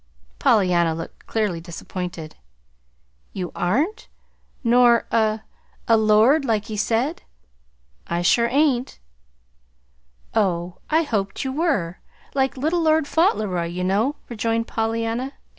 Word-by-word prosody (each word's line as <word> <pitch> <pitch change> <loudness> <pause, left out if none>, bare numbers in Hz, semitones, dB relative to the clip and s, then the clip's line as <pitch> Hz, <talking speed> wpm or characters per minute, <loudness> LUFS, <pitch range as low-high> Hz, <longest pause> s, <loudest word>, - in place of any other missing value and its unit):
'" - - -32
Pollyanna 180 - +3
looked 165 - -9
clearly 210 -7 -1
disappointed. 170 -1 -7 1.0
"You 180 -2 -4
aren't? 300 - -1 0.6
Nor 240 0 +5
a 220 -1 +1 0.5
a 230 - +5
lord, 220 +7 +4
like 220 -5 0
he 215 - -6
said?" 235 - 0 0.9
"I 170 +1 -1
sure 235 +6 +4
ain't." 265 -1 +1 1.4
"Oh, 180 -4 0
I 320 +2 +3
hoped 205 -9 -2
you 265 - -2
were 265 - -1 0.3
like 265 -1 0
Little 320 +6 0
Lord 315 -2 +3
Fauntleroy, 210 - +1
you 175 +2 -4
know," 210 +10 +1
rejoined 230 0 -1
Pollyanna. 230 +4 -2
225 Hz, 115 wpm, -22 LUFS, 185-265 Hz, 1.4 s, Nor